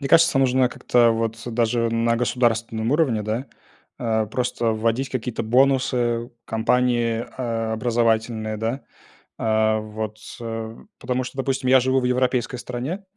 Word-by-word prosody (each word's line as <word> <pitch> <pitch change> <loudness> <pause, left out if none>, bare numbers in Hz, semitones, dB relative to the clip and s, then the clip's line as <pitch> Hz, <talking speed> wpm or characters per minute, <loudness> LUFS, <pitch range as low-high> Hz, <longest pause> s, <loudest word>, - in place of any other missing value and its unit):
Мне 140 - -3
кажется, 165 -2 +5
нужно 130 -1 +3
как-то 120 -1 +3
вот 115 0 -1
даже 115 0 +1
на 115 0 +1
государственном 115 -2 0
уровне, 140 -9 +2
да, 110 +6 -3 0.5
а, 110 -2 0
просто 120 0 -1
вводить 115 +4 -1
какие-то 125 -2 -3
бонусы, 125 -1 +2
компании, 115 0 +1
а, 115 -3 -2
образовательные, 110 -1 0
да. 115 +5 -3 0.6
А 110 -1 +2
вот, 110 0 -5 0.2
э, 115 -1 -5 0.2
потому 125 +1 -1
что, 130 +2 -9
допустим, 135 -1 -1
я 130 0 +7
живу 130 +1 +2
в - - -4
европейской 125 -1 0
стране, 125 +11 -5
120 Hz, 135 wpm, -23 LUFS, 115-125 Hz, 0.6 s, я